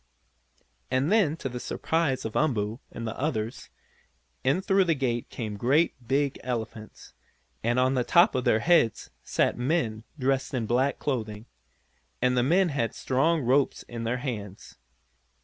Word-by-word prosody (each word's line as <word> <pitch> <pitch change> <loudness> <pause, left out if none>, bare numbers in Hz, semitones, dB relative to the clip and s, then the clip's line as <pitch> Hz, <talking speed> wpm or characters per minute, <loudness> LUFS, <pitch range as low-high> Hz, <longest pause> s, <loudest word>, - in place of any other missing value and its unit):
And 130 +7 +1
then, 190 -8 +3
to 135 - -4
the 125 -1 -5
surprise 160 -1 -1
of 110 - -4
Umboo 115 -6 0
and 115 - -6
the 110 - -4
others, 125 -6 -3 0.7
in 135 +7 +2
through 195 -1 +3
the 165 -2 +2
gate 120 -4 -2
came 105 -3 -5
great 140 +10 +2
big 140 +2 0
elephants, 115 -3 -6 0.5
and 120 +2 +1
on 130 +1 +3
the 125 -2 +1
tops 175 - +5
of 130 - -1
their 110 - +3
heads 165 -11 +2
sat - - 0
men, 125 -6 0
dressed 135 0 0
in 120 -3 -1
black 130 +5 +1
clothing. 110 -6 -3 0.7
And 125 0 +2
the 125 - +3
men 175 +8 +3
had 135 -6 -2
strong 155 +5 +1
ropes 135 +3 +2
in 115 -1 -7
their 115 +2 -1
hands. 110 -7 -6
130 Hz, 155 wpm, -27 LUFS, 115-145 Hz, 0.7 s, tops